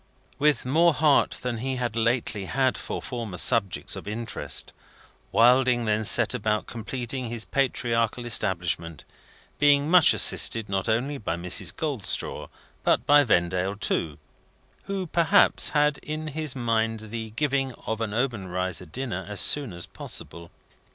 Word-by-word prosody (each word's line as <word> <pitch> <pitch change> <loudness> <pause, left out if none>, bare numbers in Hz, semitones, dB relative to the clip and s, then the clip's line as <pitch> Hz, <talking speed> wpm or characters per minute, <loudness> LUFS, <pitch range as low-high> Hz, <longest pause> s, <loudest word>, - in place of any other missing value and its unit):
With 150 -2 +2
more 165 +5 +3
heart 150 -2 +3
than 120 -3 -3
he 130 +2 -3
had 120 -3 -3
lately 115 -3 -1
had 130 +5 0
for - - -6
former 115 -7 -6
subjects 105 -5 +1
of - - -9
interest, 110 +1 -4 0.6
Wilding 125 0 +4
then 110 0 0
set - - +3
about 105 -3 -1
completing 125 +2 -5
his 115 -2 -3
patriarchal 120 -3 -1
establishment, 90 -7 -1 0.5
being 145 +1 +3
much 180 -4 +7
assisted 110 -2 +4
not 95 +2 -2
only 135 +6 -1
by 85 -6 -3
Mrs. 90 +1 0
Goldstraw 140 - -2 0.4
but - - +1
by 145 0 +6
Vendale 95 -3 0
too: 80 -7 -1 0.7
who, 195 -1 -3
perhaps, 170 -1 +3
had 150 -1 +1
in 155 0 -5
his 155 -2 -2
mind 115 -3 -2
the 115 -1 -5
giving 135 -1 0
of 110 0 -3
an 110 -2 -2
Obenreizer 95 - -3
dinner 115 - -5
as 105 - -2
soon 140 -6 +3
as 85 0 -4
possible. 85 0 -6
115 Hz, 140 wpm, -25 LUFS, 105-135 Hz, 0.7 s, much